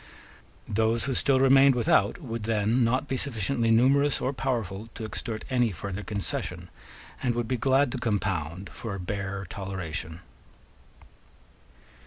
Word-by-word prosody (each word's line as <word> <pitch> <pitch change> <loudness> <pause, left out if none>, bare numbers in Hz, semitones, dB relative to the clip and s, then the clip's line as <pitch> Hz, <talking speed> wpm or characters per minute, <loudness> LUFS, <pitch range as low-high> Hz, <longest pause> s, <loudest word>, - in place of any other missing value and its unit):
Those 110 +2 +1
who 135 - -1
still 135 +1 +2
remained 135 0 +6
without 115 - +2
would 115 -8 -5
then 115 +2 +2
not 130 +5 +1
be 135 - -1
sufficiently 120 -2 0
numerous 135 +5 +4
or 130 - -1
powerful 115 -6 -3
to 110 - -5
extort 110 0 -5
any 125 -3 +2
further 100 +2 -5
concession, 100 -2 -3 0.5
and 125 -3 0
would 120 -1 -1
be 130 - 0
glad 135 +2 +2
to 130 - -3
compound 95 -6 -2
for 110 -4 -6
a - - -6
bare 100 +1 -4
toleration. 90 -4 -5
115 Hz, 140 wpm, -27 LUFS, 100-130 Hz, 0.5 s, remained